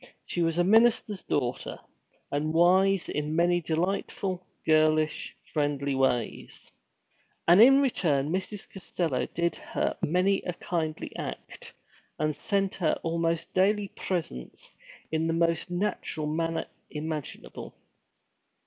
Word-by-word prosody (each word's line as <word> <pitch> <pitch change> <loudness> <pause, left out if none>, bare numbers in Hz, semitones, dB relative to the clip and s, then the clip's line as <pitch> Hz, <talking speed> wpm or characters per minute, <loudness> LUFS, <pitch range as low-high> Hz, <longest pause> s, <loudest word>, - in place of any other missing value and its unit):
She 175 - -2
was 165 0 +1
a 175 - +4
minister's 220 0 +4
daughter, 125 -3 -2 0.5
and 155 +2 -1
wise 185 +2 +4
in 150 +1 -2
many 175 +1 +3
delightful, 180 +2 -2 0.2
girlish, 155 0 +2 0.2
friendly 145 -2 0
ways. 130 -3 -1 0.8
And 175 +5 +8
in 270 +4 +8
return 155 - +1
Mrs. 190 +3 -3
Costello 170 -7 -2
did 170 0 0
her - - -2
many 185 +5 +2
a 180 - -4
kindly 160 -3 -3
act, - - -7 0.4
and 155 -1 0
sent 195 +3 0
her 165 -5 0
almost 165 0 -1
daily 200 +2 +2
presents 155 - -5 0.4
in 160 +1 0
the 165 - +1
most 165 0 +1
natural 175 -4 -2
manner 165 +2 -1 0.2
imaginable. 155 -1 -6
165 Hz, 115 wpm, -28 LUFS, 155-185 Hz, 0.8 s, And